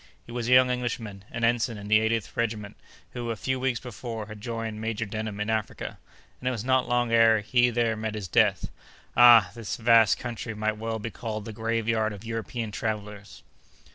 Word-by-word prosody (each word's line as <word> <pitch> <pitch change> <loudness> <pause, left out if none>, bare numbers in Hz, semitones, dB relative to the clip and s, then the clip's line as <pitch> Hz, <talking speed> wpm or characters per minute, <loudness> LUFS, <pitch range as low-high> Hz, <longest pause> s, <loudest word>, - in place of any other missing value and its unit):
He - - -12
was 120 0 -3
a - - +1
young 125 0 +6
Englishman, 115 -5 -4
an 115 - -5
ensign 115 -1 +1
in 100 0 -8
the 110 +1 +5
80th 110 -1 -1
regiment, 110 -3 -2 0.4
who, 120 -1 -5
a 115 - -1
few 130 +7 -2
weeks 130 -3 0
before, 115 -2 -6
had 105 -1 -10
joined 115 -2 -4
Major 110 0 -2
Denham 110 0 -5
in 105 - -2
Africa, 110 -2 -3 0.4
and 125 - -5
it - - +2
was 115 -4 -4
not 130 0 +2
long 120 -1 +1
ere 115 -1 +5
he 120 +3 +3
there 115 -1 +1
met 110 0 -4
his 105 -3 -5
death. - - +2 0.4
Ah! 115 -6 +8
this 115 -1 -5
vast 115 -2 +5
country 115 -2 -5
might 110 0 -1
well 115 +1 -3
be 110 +1 -5
called 110 -3 -5
the 115 - -7
graveyard 115 0 0
of 100 +2 -10
European 115 0 -4
travellers." 105 -1 -5
115 Hz, 200 wpm, -27 LUFS, 110-120 Hz, 0.4 s, Ah